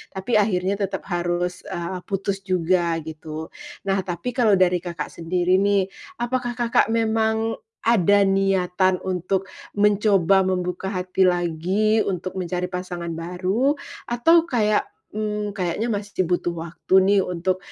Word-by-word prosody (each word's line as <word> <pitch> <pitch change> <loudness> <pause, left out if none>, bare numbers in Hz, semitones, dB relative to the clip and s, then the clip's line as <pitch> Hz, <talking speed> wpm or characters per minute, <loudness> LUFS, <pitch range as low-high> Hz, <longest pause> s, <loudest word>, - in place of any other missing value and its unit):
tapi 210 +3 +1
akhirnya 195 -1 +1
tetap 195 -1 -2
harus, 175 +1 -1
eee, 175 +2 -4
putus 195 0 -2
juga 180 -2 +1
gitu. 155 0 -7 0.3
Nah, 195 0 +1
tapi 185 +7 -4
kalau 230 -5 +3
dari 180 -1 +3
Kakak 175 -1 -6
sendiri 180 +2 +1
nih, 200 -1 +2 0.3
apakah 245 0 -2
Kakak 240 -2 +2
memang 225 0 0 0.2
ada 205 -3 +4
niatan 190 -1 +2
untuk 185 +1 -1 0.3
mencoba 200 -2 +4
membuka 180 0 -2
hati 185 0 +1
lagi 180 +5 +1
untuk 185 0 -3
mencari 180 +1 -3
pasangan 175 -2 -4
baru? 185 - 0 0.3
Atau 325 +8 +4
kayak, 215 -7 +2 0.3
mmm, 210 -1 -2
kayaknya 185 +6 -1
masih 205 -3 -1
butuh 175 -1 0
waktu 170 +3 -5
nih 195 +1 +4
untuk 180 +1 -1
190 Hz, 130 wpm, -23 LUFS, 180-210 Hz, 0.3 s, ada